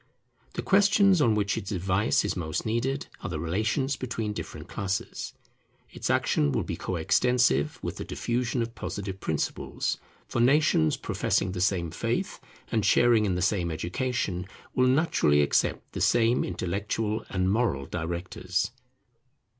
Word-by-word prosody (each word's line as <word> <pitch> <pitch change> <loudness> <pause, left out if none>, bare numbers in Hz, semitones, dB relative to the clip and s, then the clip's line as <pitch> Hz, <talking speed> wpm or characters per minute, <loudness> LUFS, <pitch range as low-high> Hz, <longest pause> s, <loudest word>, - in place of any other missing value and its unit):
The - - -3
questions 200 -2 +5
on 115 -6 +4
which 100 -1 +1
its 95 - -7
advice 95 +2 +1
is - - -1
most 80 -4 -3
needed 125 +5 -1 0.2
are - - -4
the 80 -3 -3
relations 110 - 0
between 115 -4 -3
different - - -7
classes. 95 -1 -3 0.6
Its - - -4
action 70 -1 +2
will - - 0
be - - -4
coextensive 90 - +2
with - - -4
the - - -4
diffusion 120 0 -1
of 115 0 -6
Positive 95 -1 -5
principles; 80 -5 -2 0.3
for 120 - -1
nations 130 - +4
professing 95 - 0
the 90 -1 -3
same 90 -3 +1
faith, - - -2 0.3
and 110 -2 +1
sharing 115 +1 +4
in 95 - 0
the 90 - 0
same 95 -3 +1
education, 90 +2 -2 0.3
will 130 0 +3
naturally 125 - +3
accept 70 - 0
the - - -5
same 120 +1 +3
intellectual 100 +4 -2
and 95 0 +1
moral 100 - +1
directors. 90 +4 -3
100 Hz, 145 wpm, -27 LUFS, 90-120 Hz, 0.6 s, questions